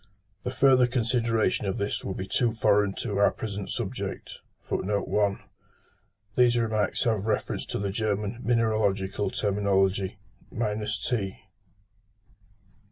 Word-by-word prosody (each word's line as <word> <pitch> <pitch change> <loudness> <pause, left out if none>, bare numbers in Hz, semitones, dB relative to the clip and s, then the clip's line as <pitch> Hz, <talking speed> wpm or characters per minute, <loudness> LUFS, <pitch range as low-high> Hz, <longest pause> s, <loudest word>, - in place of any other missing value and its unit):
The - - -2
further 130 -1 +5
consideration 115 -3 +1
of 95 - -1
this 100 0 -2
would 95 - -4
be 95 - -3
too 115 +3 +1
foreign 105 -3 +3
to 100 -4 -2
our 100 - +6
present 100 -2 -5
subject. - - -4 0.3
These 105 +3 -1
remarks 110 -3 0
have 110 -4 0
reference 110 - -1
to - - -3
the 100 0 -2
German 105 +1 -1
mineralogical 110 -5 +1
terminology. 100 -1 +1 0.4
T. 105 -1 -2
105 Hz, 105 wpm, -27 LUFS, 100-115 Hz, 0.4 s, our